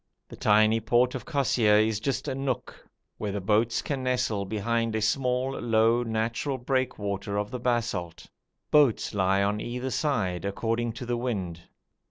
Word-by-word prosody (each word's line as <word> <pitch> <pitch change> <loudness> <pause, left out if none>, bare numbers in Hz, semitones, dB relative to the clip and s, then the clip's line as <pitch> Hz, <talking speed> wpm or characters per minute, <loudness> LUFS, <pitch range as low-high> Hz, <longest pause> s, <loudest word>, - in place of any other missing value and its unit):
The - - -9
tiny 110 +2 +4
port 120 +3 +2
of 130 - -6
Kosseir 125 -8 +3
is 110 0 +2
just 135 +3 -2
a - - -1
nook 135 -3 -3 0.5
where 105 - -2
the 100 - -2
boats 110 +4 +1
can 140 -3 -3
nestle 125 -5 0
behind 115 +2 -1
a - - +1
small, 125 +2 +1
low, 115 +1 +3
natural 115 +4 -2
breakwater 105 -6 -2
of 105 0 -2
the 125 - -4
basalt. 115 -9 -2 0.5
Boats 145 -7 +3
lie 95 0 +2
on 105 +1 0
either 125 +2 -4
side, 105 - -1
according 115 +4 -1
to 120 +2 -7
the 120 0 -1
wind. 95 -9 -3
115 Hz, 160 wpm, -27 LUFS, 105-125 Hz, 0.5 s, tiny